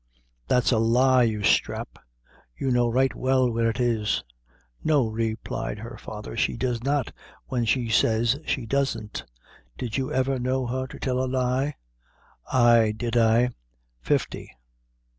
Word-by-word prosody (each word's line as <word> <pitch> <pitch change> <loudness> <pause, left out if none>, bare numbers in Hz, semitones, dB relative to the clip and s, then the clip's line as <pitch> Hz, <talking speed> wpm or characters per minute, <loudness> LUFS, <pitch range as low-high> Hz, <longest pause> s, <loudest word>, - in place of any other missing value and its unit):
"That's 125 +1 +2
a 115 - +3
lie, 125 +3 +4
you 110 -3 +1
sthrap; - - 0 0.6
you 135 - -1
know 120 -1 +3
right 130 +3 +2
well 130 -1 +2
where 115 0 +1
it 115 - -4
is." 115 -4 0 0.6
"No," 150 -5 +3
replied 110 -1 -3
her 115 +4 -8
father, 105 0 -8
"she 115 - 0
does 120 -1 -1
not, 140 -2 0 0.3
when 120 -2 -1
she 120 +2 +1
says 115 +3 +2
she 130 -6 -2
doesn't. 115 -4 -2 0.5
Did 120 -1 -3
you 130 -1 -2
ever 130 0 0
know 130 +1 0
her 130 +2 -2
to - - -11
tell 130 -1 -1
a - - -1
lie?" 130 +3 0 0.8
"Ay 120 -4 +4
did 120 0 -3
I 115 +1 +4 0.5
fifty." - - -1
120 Hz, 145 wpm, -25 LUFS, 115-130 Hz, 0.8 s, lie